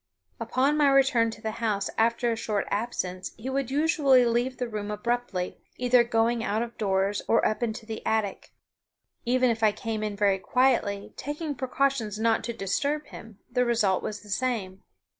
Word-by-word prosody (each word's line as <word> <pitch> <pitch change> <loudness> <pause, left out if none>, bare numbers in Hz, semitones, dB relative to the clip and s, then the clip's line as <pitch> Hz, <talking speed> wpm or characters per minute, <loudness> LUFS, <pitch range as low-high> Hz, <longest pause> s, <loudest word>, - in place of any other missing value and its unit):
Upon 275 +4 +1
my 290 -2 +5
return 270 -4 +4
to 225 0 -10
the 220 - -1
house 205 -3 0
after 235 +1 +2
a - - 0
short 210 -2 -2
absence 190 -4 -3
he 255 +4 -5
would 270 -2 -1
usually 285 -3 +4
leave 240 +2 0
the 250 - -2
room 210 -2 -5
abruptly, 210 -3 -2 0.2
either 250 -1 +4
going 230 0 +1
out 220 0 0
of 235 0 -8
doors 195 0 +1
or 230 - +3
up 215 - -2
into 225 -1 -3
the 220 0 -6
attic. 220 -3 -1 0.7
Even 250 0 +3
if 225 0 -3
I 215 -1 +5
came 220 +1 -4
in 210 -1 -3
very 200 -1 +2
quietly, 235 -4 +1
taking 295 +2 -4
precautions 260 -4 -1
not 225 0 +1
to 235 - -2
disturb 280 +9 -1
him, 220 -3 -11
the 250 0 +2
result 225 -6 +2
was 210 -1 -5
the 210 - -15
same. 200 -4 -2
230 Hz, 180 wpm, -27 LUFS, 210-255 Hz, 0.7 s, my